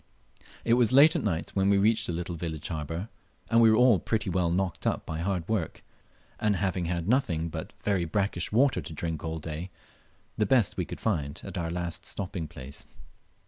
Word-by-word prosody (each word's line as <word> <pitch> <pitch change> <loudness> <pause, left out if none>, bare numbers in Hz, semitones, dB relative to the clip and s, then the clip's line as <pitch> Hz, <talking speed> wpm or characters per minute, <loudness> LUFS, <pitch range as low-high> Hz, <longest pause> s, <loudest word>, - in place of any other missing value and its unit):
It 115 - +4
was 120 -2 +4
late 145 +5 +7
at - - 0
night 85 -6 -1
when 95 0 +2
we 100 - +5
reached 110 +3 +3
the - - -1
little 85 +1 -3
village 80 -2 -5
harbour, 80 +4 -4 0.4
and 115 +1 +6
we 115 - +7
were 110 - +5
all 125 -5 +6
pretty 110 +1 -1
well 90 -1 +1
knocked 90 0 -1
up - - -1
by 80 0 -4
hard 90 -1 -1
work, 105 -7 -2 0.6
and 105 -1 +2
having 95 -2 -1
had 85 0 -2
nothing 90 - +1
but - - -6
very 95 -4 +1
brackish 95 0 -1
water 120 -3 +3
to 80 +2 -8
drink 80 0 -4
all 80 0 -3
day 80 +3 -5 0.7
the 105 - +2
best 120 -5 +3
we - - -1
could - - -8
find 75 -10 -1
at - - -7
our 85 -1 -2
last 85 0 -3
stopping 90 -4 -3
place. 70 0 -9
90 Hz, 200 wpm, -28 LUFS, 80-105 Hz, 0.7 s, late